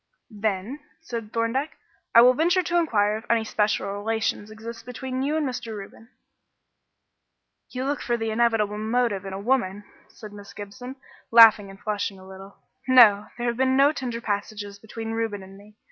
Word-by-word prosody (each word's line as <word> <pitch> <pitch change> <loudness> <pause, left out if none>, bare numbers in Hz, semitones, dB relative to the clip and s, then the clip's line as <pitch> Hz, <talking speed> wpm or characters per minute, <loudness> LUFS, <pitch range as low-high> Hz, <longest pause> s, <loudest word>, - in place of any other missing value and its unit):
"Then," 210 +5 -2 0.2
said 230 -9 -7
Thorndyke, 230 +7 -2 0.4
"I 230 - +10
will 250 +1 +7
venture 345 +6 +2
to 345 +1 0
inquire 215 -10 +2
if 225 - -11
any 230 -1 +2
special 210 -1 0
relations 215 0 -2
exist 225 +1 -9
between 255 +2 -5
you 295 +3 0
and 305 -3 0
Mr. 235 -4 -5
Reuben." 215 +3 -12 1.6
"You 255 +1 -4
look 285 +1 -2
for 240 -1 -1
the 225 -1 -2
inevitable 220 -2 +1
motive 220 -3 0
in 190 - -6
a 190 - -5
woman," 205 -3 0 0.2
said 210 -2 -12
Miss 205 -1 -12
Gibson, 245 +6 -9 0.3
laughing 225 -3 +7
and 195 0 -13
flushing 205 -2 -3
a 190 0 -14
little. 190 +1 -12 0.3
"No, 220 -6 +6
there 240 - -3
have 235 -1 -1
been 260 0 +2
no 280 +2 +5
tender 245 -5 -5
passages 205 -1 -4
between 225 +1 -7
Reuben 225 -3 -3
and 190 +1 -13
me. 205 +2 -17
225 Hz, 175 wpm, -24 LUFS, 205-250 Hz, 1.6 s, I